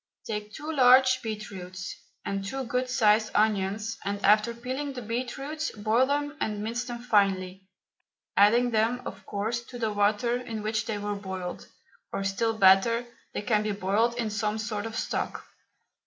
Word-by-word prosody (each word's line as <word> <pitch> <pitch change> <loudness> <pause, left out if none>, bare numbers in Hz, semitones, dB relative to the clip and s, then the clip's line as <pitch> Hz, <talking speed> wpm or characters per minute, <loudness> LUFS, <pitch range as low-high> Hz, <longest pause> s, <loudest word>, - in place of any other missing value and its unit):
Take 210 -1 -4
two 300 +9 -6
large 255 -2 +6
beetroots 190 -5 -6 0.3
and 195 0 -2
two 265 +7 -3
good 250 +1 -1
sized 215 -2 +3
onions, 215 +1 +1
and 200 +1 -2
after 215 +3 +5
peeling 260 +4 -4
the 250 - -6
beetroots 265 +7 -3
boil 220 +4 +2
them 290 +1 -1
and 210 -1 -1
mince 235 +3 -2
them 240 -1 -5
finely, 195 -5 +1 0.7
adding 235 +4 +5
them, 230 +3 +1
of - - -7
course, 220 +4 -2
to 245 - -9
the 220 -3 -1
water 210 +4 +2
in 225 -4 -6
which 215 +1 -1
they 215 - -2
were 205 0 -2
boiled, 190 -3 -6 0.4
or 195 - -2
still 220 +3 0
better, 200 +5 +5 0.3
they - - -2
can 215 -2 +2
be 210 -1 -1
boiled 205 +5 +1
in 230 -3 -1
some 210 +1 -1
sort 215 -1 -3
of 225 - -7
stock. - - -2
220 Hz, 165 wpm, -28 LUFS, 205-245 Hz, 0.7 s, large